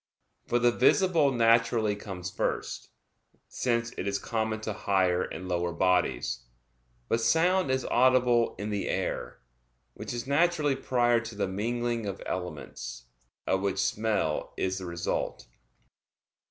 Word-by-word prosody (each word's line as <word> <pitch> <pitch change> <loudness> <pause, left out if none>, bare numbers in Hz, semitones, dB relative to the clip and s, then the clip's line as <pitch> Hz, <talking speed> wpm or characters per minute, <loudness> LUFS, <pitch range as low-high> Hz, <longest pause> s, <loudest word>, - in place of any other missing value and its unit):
For 120 - +2
the 120 0 +4
visible 155 +4 +4
naturally 115 -2 +3
comes 95 -3 -6
first; 95 - -3 0.6
since 115 -1 -1
it 95 - -2
is 100 0 0
common 110 +1 -2
to 110 -1 -3
higher 95 -3 +1
and 90 - -5
lower 85 -1 -1
bodies. 90 -8 +1 0.7
But 115 - +1
sound 180 +5 +3
is 130 -1 0
audible 125 -1 +3
in 105 +1 -4
the 100 -1 -2
air, - - -3 0.5
which - - -7
is 120 0 -4
naturally 150 0 +2
prior 120 -3 +2
to 115 -1 -8
the 100 -1 -1
mingling 115 +3 -2
of 95 - -4
elements, 85 -8 -6 0.4
of 95 - +1
which 100 -1 -1
smell 100 -4 0
is 95 0 -1
the 90 - -6
result. 85 0 -3
110 Hz, 135 wpm, -28 LUFS, 95-120 Hz, 0.7 s, the